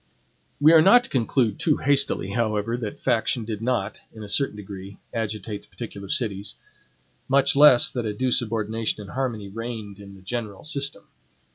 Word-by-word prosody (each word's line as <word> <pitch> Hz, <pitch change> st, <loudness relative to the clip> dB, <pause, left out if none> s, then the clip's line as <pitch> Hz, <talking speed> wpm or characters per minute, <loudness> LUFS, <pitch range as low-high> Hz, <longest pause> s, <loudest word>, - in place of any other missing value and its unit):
We 155 Hz, +3 st, +6 dB
are 160 Hz, -, +8 dB
not 240 Hz, +8 st, +7 dB
to -, -, -9 dB
conclude 120 Hz, -3 st, +1 dB
too 155 Hz, -4 st, +2 dB
hastily, 140 Hz, -8 st, +1 dB
however, 110 Hz, 0 st, 0 dB
that 115 Hz, -4 st, -5 dB
faction 115 Hz, 0 st, +1 dB
did 110 Hz, -1 st, -5 dB
not, 125 Hz, +2 st, -1 dB
in 110 Hz, -, -10 dB
a 105 Hz, -, -8 dB
certain 135 Hz, +1 st, +1 dB
degree, 100 Hz, -1 st, -9 dB, 0.2 s
agitate 110 Hz, -2 st, -4 dB
the -, -, -22 dB
particular 100 Hz, -5 st, -8 dB
cities; 100 Hz, -4 st, -1 dB, 0.7 s
much 140 Hz, +1 st, +3 dB
less 140 Hz, -4 st, +7 dB
that 120 Hz, -3 st, -3 dB
a -, -, -1 dB
due 125 Hz, +5 st, -1 dB
subordination 110 Hz, -2 st, -1 dB
and 100 Hz, -, -10 dB
harmony 120 Hz, -6 st, -3 dB
reigned 110 Hz, -1 st, -7 dB
in 100 Hz, -1 st, -11 dB
the 95 Hz, -, -16 dB
general 105 Hz, -1 st, -5 dB
system. 140 Hz, -8 st, -3 dB
115 Hz, 170 wpm, -24 LUFS, 105-130 Hz, 0.7 s, are